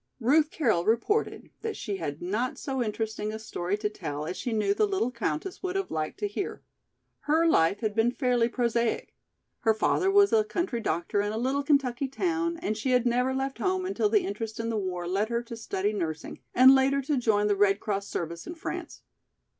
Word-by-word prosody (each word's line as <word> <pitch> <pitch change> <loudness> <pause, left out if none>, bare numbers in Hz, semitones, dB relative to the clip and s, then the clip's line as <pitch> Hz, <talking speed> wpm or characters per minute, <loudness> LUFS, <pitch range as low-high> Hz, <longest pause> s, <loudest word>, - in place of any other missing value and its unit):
Ruth 295 +6 +4
Carroll 225 - +1
reported 235 - 0
that 450 -1 -3
she 205 -4 -3
had 155 -3 -5
not 215 +8 -1
so 265 -2 -3
interesting 215 -1 -2
a 220 - -4
story 200 -3 -3
to 210 - -1
tell 150 -8 -5
as 180 - -4
she 245 - -3
knew 225 - +2
the 425 +1 +2
little 380 - 0
countess 310 - -3
would 370 0 -3
have 390 0 -2
liked 155 -1 -3
to 205 - +1
hear. 210 - -5 0.7
Her 320 +2 +4
life 195 - +3
had 215 -2 -1
been 225 +2 +3
fairly 245 -3 +1
prosaic; 235 -1 0 0.5
her 220 -1 +2
father 370 - +2
was 400 0 +5
a 220 - +5
country 240 - -2
doctor 175 +3 0
in 205 0 -1
a 220 - -3
little 265 +4 0
Kentucky 275 -2 +1
town 335 +3 -1
and 215 - 0
she 220 +5 -2
had 250 -1 +3
never 250 +2 +2
left 270 +1 -2
home 375 -1 0
until 390 +2 +1
the 420 -3 +3
interest 225 - -5
in 230 0 -2
the 230 - -1
war 185 -4 -3
led 200 +5 0
her 235 0 -1
to 230 0 -8
study 210 -2 -2
nursing 160 -5 -4 0.2
and 260 +2 +9
later 270 +1 +3
to 290 +2 0
join 220 -5 +2
the 205 -1 +2
Red 200 0 +3
Cross 200 -1 -2
service 170 0 -5
in 345 - -6
France. 325 - -6
235 Hz, 210 wpm, -28 LUFS, 205-280 Hz, 0.7 s, and